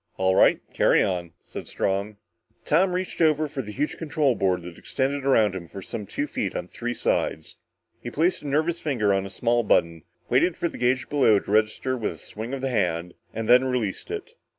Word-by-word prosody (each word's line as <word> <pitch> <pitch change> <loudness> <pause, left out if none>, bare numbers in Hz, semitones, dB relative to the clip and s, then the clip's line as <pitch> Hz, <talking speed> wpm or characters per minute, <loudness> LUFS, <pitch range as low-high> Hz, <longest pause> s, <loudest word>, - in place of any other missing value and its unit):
"All 95 0 +2
right, - - +5
carry - - +4
on," 85 -3 -2
said - - -8
Strong. 100 +2 -2 0.5
Tom 180 +4 +3
reached 180 -1 -3
over 155 -1 +3
the 135 -7 -5
huge 145 +7 -2
control 150 -4 +1
board 95 -5 0
that 85 -1 -10
extended 140 +1 -2
around 110 -7 +4
him 90 -3 -6
for 95 - -9
some 105 +1 -6
two 145 - -2
feet 105 -9 -3
on - - -3
three 120 +5 -4
sides. 80 -6 -1 0.4
He 120 - -5
placed 170 +8 +1
a 150 - -7
nervous 160 +4 0
finger 115 -9 +1
on 95 0 0
a - - -9
small 120 +4 +1
button, 85 -6 +2 0.3
waited 150 +8 +2
for - - 0
the - - -10
gauge 125 +1 +1
below 130 -8 +4
to 100 - -4
register 110 +4 +1
with 115 -4 -2
a - - -14
swing 110 +3 -7
of 135 -1 -4
the 135 - -1
hand, 90 -5 0 0.2
and 110 0 -4
then 125 +1 +7
released 125 - -2
it. 430 +2 -6
120 Hz, 205 wpm, -25 LUFS, 100-145 Hz, 0.5 s, then